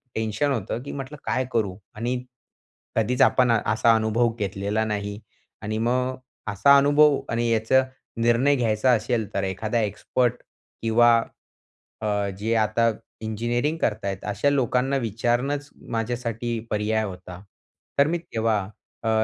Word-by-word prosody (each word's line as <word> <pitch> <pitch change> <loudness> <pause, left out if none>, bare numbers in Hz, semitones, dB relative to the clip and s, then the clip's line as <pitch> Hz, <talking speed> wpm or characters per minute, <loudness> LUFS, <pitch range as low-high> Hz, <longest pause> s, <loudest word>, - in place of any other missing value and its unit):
Tension 110 +6 0
होतं 115 -2 -2
की 140 - -6
म्हटलं 140 +2 -6
काय 130 - 0
करू. 100 -5 0 0.2
आणि 125 +3 -2 0.7
कधीच 115 +3 +1
आपण 125 -2 +5
असा 115 +1 +3
अनुभव 110 +1 +1
घेतलेला 100 +2 -1
नाही. 105 -1 -3 0.4
आणि 110 +1 -2
मग 125 +3 0 0.4
असा 140 +8 +5
अनुभव 145 +1 +5
आणि 120 +1 0
याचा 115 +4 +3 0.4
निर्णय 120 +5 +4
घ्यायचा 115 0 +2
असेल 110 -2 0
तर 100 - -1
एखादा 110 +5 -1
एक्सपर्ट 120 +4 -1 0.4
किंवा 115 +1 +5 0.9
अ, 105 -2 0
जे 110 +3 0
आता 115 +2 +2 0.3
इंजिनिअरिंग 120 +7 -1
करत 110 -1 0
आहेत 95 -1 -3
अशा 105 +7 +1
लोकांना 135 0 +1
विचारणंच 120 +6 -1 0.2
माझ्यासाठी 115 0 -2
पर्याय 110 +1 0
होता. 90 -2 -8 0.6
तर 140 - +6
मी 170 +2 0
तेव्हा 115 -8 0 0.5
अ, 115 - 0
115 Hz, 130 wpm, -24 LUFS, 105-125 Hz, 0.9 s, तर